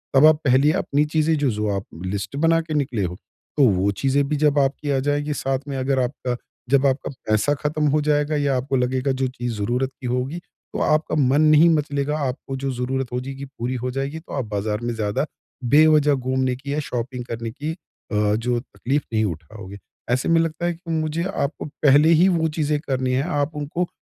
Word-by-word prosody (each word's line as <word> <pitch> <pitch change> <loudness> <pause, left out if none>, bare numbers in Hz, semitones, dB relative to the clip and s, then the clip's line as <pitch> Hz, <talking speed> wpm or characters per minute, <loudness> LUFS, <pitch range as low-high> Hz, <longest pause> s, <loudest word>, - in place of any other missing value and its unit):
तब 135 +3 +7
आप 155 0 +7
पहले 135 +3 +4
अपनी 150 -5 +1
चीजें 155 +1 +1
जो-जो 110 -7 0
आप 95 - -4 0.2
लिस्ट 100 +4 -4
बना 165 +3 +3
के 160 -1 -6
निकले 130 -8 0
हो। 90 -1 -3 0.4
तो 145 - +5
वो 95 +1 +1
चीज़ें 135 +7 +1
भी 150 - 0
जब 145 -1 +3
आपकी 140 +1 0
आ 135 - +2
जाएगी 145 +1 0
साथ 135 -2 -1
में 140 -1 -3
अगर 135 +1 0
आपका, 125 0 -3 0.3
जब 140 +1 +4
आपका 135 +1 -1 0.2
पैसा 110 +6 +3
ख़त्म 150 0 +1
हो 150 +2 +2
जाएगा 150 0 +1
या 140 -2 +1
आपको 135 +2 -2
लगेगा 130 +2 0
जो 130 0 0
चीज़ 120 -1 -4
ज़रूरत 125 +6 0
की 125 - -4
होगी 125 +7 -2 0.3
तो - - -3
आपका 155 +1 +1
मन 140 0 +3
नहीं 155 +2 +6
मचलेगा 145 0 -1
आपको 135 +1 -5
जो 135 0 -2
ज़रूरत 130 +1 -2
हो 125 - 0
जाएगी, 135 +1 -6
पूरी 130 -2 -4
हो 125 +1 -3
जाएगी 135 +4 -3
तो 160 - -12
आप 130 - -1
बाज़ार 105 0 -2
में 120 0 -1
ज़्यादा 110 +5 -1 0.4
बेवजह 150 +2 +5
घूमने 130 -1 0
की 140 +2 -5
या 150 - 0
शॉपिंग 125 -2 -4
करने 115 -1 -5
की 150 +7 -4
अ, 105 - -2
जो 120 +2 0
तकलीफ़ 135 +3 -2
नहीं 110 0 +2
उठाओगे। 95 +3 -7 0.3
ऐसे 130 +2 +1
में 165 0 +5
लगता 165 +1 -2
है 175 - +1
कि 165 0 -8
मुझे 160 +1 -1
आपको 140 - -2
पहले 145 +1 +4
ही 170 +3 +5
वो 165 -3 +2
चीज़ें 150 -1 +1
करनी 130 -4 -1
है, 130 +2 +1
आप 150 -2 -1
उनको 150 +4 -2
135 Hz, 205 wpm, -22 LUFS, 125-150 Hz, 0.4 s, तब